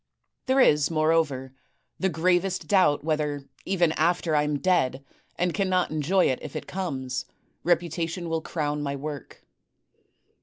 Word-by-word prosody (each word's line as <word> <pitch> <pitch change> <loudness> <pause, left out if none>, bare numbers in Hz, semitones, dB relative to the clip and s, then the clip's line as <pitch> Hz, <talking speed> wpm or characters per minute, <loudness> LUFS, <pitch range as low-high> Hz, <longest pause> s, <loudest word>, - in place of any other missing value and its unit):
There 260 +1 +3
is, 150 - +5
moreover, 155 -5 +1 0.5
the 190 - +1
gravest 175 +3 +1
doubt 185 -9 +3
whether, 150 -3 -1 0.2
even 175 -4 +2
after 165 0 +1
I 150 - +4
am 150 0 0
dead 135 -4 +1 0.3
and 180 0 0
cannot 185 -4 +1
enjoy 155 +5 +2
it 130 - +1
if 150 - -8
it - - -4
comes, 135 -9 -3 0.4
reputation 170 0 0
will 165 0 -1
crown 150 -3 -2
my 140 -1 -2
work. 145 -1 -7
160 Hz, 140 wpm, -26 LUFS, 145-180 Hz, 0.5 s, is